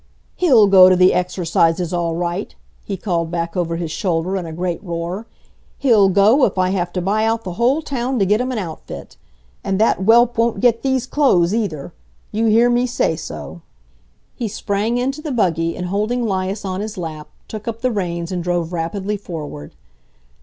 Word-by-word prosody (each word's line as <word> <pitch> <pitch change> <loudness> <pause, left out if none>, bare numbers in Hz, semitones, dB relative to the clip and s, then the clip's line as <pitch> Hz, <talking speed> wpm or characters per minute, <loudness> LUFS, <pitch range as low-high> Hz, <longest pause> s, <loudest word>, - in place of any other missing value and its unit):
"He'll 260 - +5
go 190 -2 +8
to 185 - +5
the 185 +1 +5
exercises 175 -1 0
all 170 -2 -1
right!" 175 +3 -3 0.3
he 195 - -4
called 170 -4 -2
back 170 -1 -3
over 170 -2 -1
his 165 -2 -4
shoulder 175 +2 -1
in 180 -3 -3
a - - -6
great 175 +3 -3
roar. 175 +4 -4 0.5
"He'll 220 -8 +4
go, 205 +8 +4
if 195 - -2
I 185 0 +2
have 175 -2 -1
to 180 - -1
buy 210 +4 +1
out 225 0 0
the 180 - -5
whole 270 +7 +2
town 260 -2 -2
to 200 - +2
get 210 +4 +2
him 255 +1 -2
an 250 - -3
outfit! 170 -7 -7 0.5
And 195 0 -1
that 220 - +3
whelp 230 +4 +4
won't 230 0 +1
get 235 -2 +3
these 265 -2 0
clothes, 205 - +2
either; 175 -9 -3 0.4
you 225 +2 0
hear 225 +2 +5
me 245 +1 +2
say 235 -8 0
so!" 160 +2 -8 0.7
He 235 - -4
sprang 210 +2 -1
into 270 +4 -2
the 305 -2 -4
buggy 165 -8 0
and, 180 - -4
holding 215 +6 -1
'Lias 195 0 -2
on 190 0 -3
his 215 -1 -6
lap, 155 -4 -6 0.2
took 215 0 -8
up 230 0 -4
the 255 0 +1
reins 170 -5 -3
and 180 -2 -3
drove 175 -1 -1
rapidly 190 +5 -2
forward. 155 - -8
195 Hz, 190 wpm, -19 LUFS, 175-230 Hz, 0.7 s, go